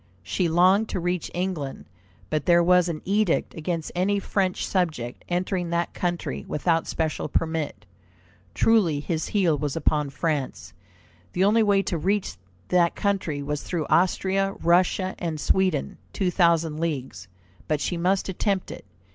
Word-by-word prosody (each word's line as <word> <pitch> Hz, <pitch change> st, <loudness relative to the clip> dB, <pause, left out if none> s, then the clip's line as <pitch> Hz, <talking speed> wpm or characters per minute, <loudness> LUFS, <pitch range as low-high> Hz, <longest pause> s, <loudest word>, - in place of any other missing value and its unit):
She 105 Hz, -, 0 dB
longed 185 Hz, +6 st, +4 dB
to -, -, -2 dB
reach 175 Hz, 0 st, -2 dB
England, 175 Hz, -7 st, -3 dB, 0.5 s
but 155 Hz, -2 st, -1 dB
there 170 Hz, -1 st, +5 dB
was 180 Hz, 0 st, +4 dB
an 155 Hz, -2 st, -5 dB
edict 200 Hz, -2 st, +1 dB
against 165 Hz, 0 st, -3 dB
any 190 Hz, +3 st, +1 dB
French 195 Hz, -1 st, -1 dB
subject 155 Hz, -11 st, -2 dB
entering 180 Hz, 0 st, -1 dB
that 170 Hz, 0 st, -1 dB
country 175 Hz, -1 st, -3 dB
without 165 Hz, +2 st, 0 dB
special 160 Hz, -1 st, -2 dB
permit. 160 Hz, -10 st, -2 dB, 0.7 s
Truly 195 Hz, -10 st, +3 dB
his 160 Hz, +1 st, -2 dB
heel 185 Hz, -7 st, +2 dB
was 145 Hz, -2 st, -2 dB
upon 150 Hz, -3 st, +1 dB
France. 135 Hz, -, -3 dB, 0.6 s
The 185 Hz, -, +1 dB
only 215 Hz, +3 st, +4 dB
way 200 Hz, -2 st, +3 dB
to 170 Hz, -, -2 dB
reach 200 Hz, +4 st, -1 dB, 0.3 s
that 175 Hz, -2 st, +3 dB
country 190 Hz, -8 st, -1 dB
was 150 Hz, +1 st, -3 dB
through 165 Hz, -4 st, -3 dB
Austria, 195 Hz, +2 st, +2 dB
Russia, 185 Hz, +2 st, +3 dB
and 165 Hz, -3 st, -3 dB
Sweden, 185 Hz, -1 st, 0 dB
two 185 Hz, -3 st, 0 dB
thousand 165 Hz, -3 st, +2 dB
leagues. 135 Hz, -, -3 dB, 0.4 s
But 155 Hz, -1 st, 0 dB
she 175 Hz, -, -2 dB
must 185 Hz, +3 st, +1 dB
attempt 195 Hz, 0 st, -1 dB
it. -, -, -9 dB
175 Hz, 145 wpm, -25 LUFS, 155-190 Hz, 0.7 s, there